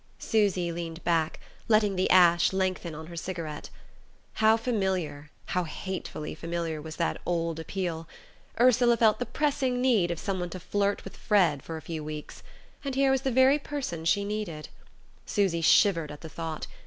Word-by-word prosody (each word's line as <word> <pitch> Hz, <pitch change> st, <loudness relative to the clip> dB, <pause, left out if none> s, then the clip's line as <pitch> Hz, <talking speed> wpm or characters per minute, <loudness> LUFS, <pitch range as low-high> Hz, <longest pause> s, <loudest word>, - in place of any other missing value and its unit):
Susy 195 Hz, -5 st, +1 dB
leaned 165 Hz, 0 st, -6 dB
back, 165 Hz, -2 st, +1 dB, 0.3 s
letting 215 Hz, -3 st, +3 dB
the 185 Hz, -, +1 dB
ash 175 Hz, -2 st, +6 dB
lengthen 185 Hz, -3 st, -1 dB
on 160 Hz, +1 st, -8 dB
her 170 Hz, +1 st, -10 dB
cigarette. 165 Hz, -3 st, -5 dB, 0.6 s
How 220 Hz, 0 st, +4 dB
familiar, 190 Hz, -, -2 dB, 0.2 s
how 180 Hz, -, -1 dB
hatefully 175 Hz, -2 st, -5 dB
familiar, 165 Hz, -1 st, -4 dB
was 160 Hz, +1 st, -8 dB
that 170 Hz, -, -1 dB
old 165 Hz, -2 st, -1 dB
appeal! 165 Hz, -1 st, -4 dB, 0.5 s
Ursula 245 Hz, -1 st, +5 dB
felt 220 Hz, -2 st, +4 dB
the 245 Hz, -, -2 dB
pressing 275 Hz, -4 st, 0 dB
need 235 Hz, -9 st, +3 dB
of 170 Hz, -, -2 dB
someone 185 Hz, -3 st, -2 dB
to 185 Hz, -, -7 dB
flirt 200 Hz, +2 st, -1 dB
with 195 Hz, -, -9 dB
Fred 175 Hz, -9 st, +2 dB
for 165 Hz, +3 st, -6 dB
a 160 Hz, -, -10 dB
few 160 Hz, -1 st, -5 dB
weeks... 150 Hz, 0 st, -7 dB, 0.4 s
and 275 Hz, -2 st, -3 dB
here 270 Hz, 0 st, +3 dB
was 265 Hz, -1 st, +2 dB
the 270 Hz, -, 0 dB
very 260 Hz, +3 st, +5 dB
person 275 Hz, -, -4 dB
she 200 Hz, +4 st, +2 dB
needed. 200 Hz, -7 st, -4 dB, 0.6 s
Susy 190 Hz, -5 st, +1 dB
shivered 165 Hz, -2 st, +4 dB
at 150 Hz, -, -10 dB
the 160 Hz, -, -8 dB
thought. 160 Hz, 0 st, -5 dB
180 Hz, 165 wpm, -28 LUFS, 165-215 Hz, 0.6 s, ash